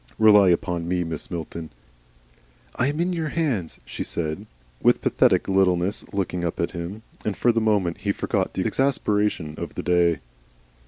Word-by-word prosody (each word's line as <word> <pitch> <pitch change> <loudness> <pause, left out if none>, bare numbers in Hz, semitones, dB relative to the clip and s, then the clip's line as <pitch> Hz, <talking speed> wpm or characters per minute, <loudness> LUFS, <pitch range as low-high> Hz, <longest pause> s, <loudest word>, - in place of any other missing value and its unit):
Rely 105 -3 +7
upon 85 -1 0
me, 90 0 0
Mrs. 80 -2 -3
Milton 85 -1 -6 0.5
" - - -32
"I 130 - +1
am 145 +2 -2
in 180 +2 +1
your 160 -3 -2
hands," 135 - -1
she - - -5
said, 80 -2 -4 0.3
with - - +4
pathetic - - +3
littleness, 95 0 +2
looking 90 -3 -2
up 85 - -2
at 85 - 0
him, 90 +5 -6 0.2
and 105 - -2
for 120 - +4
the 115 0 0
moment 100 -6 +1
he 100 - 0
forgot 100 -1 -1
the 95 - -1
exasperation 105 - 0
of - - -6
the - - -4
day. 85 -2 +3
95 Hz, 170 wpm, -24 LUFS, 85-110 Hz, 0.5 s, Rely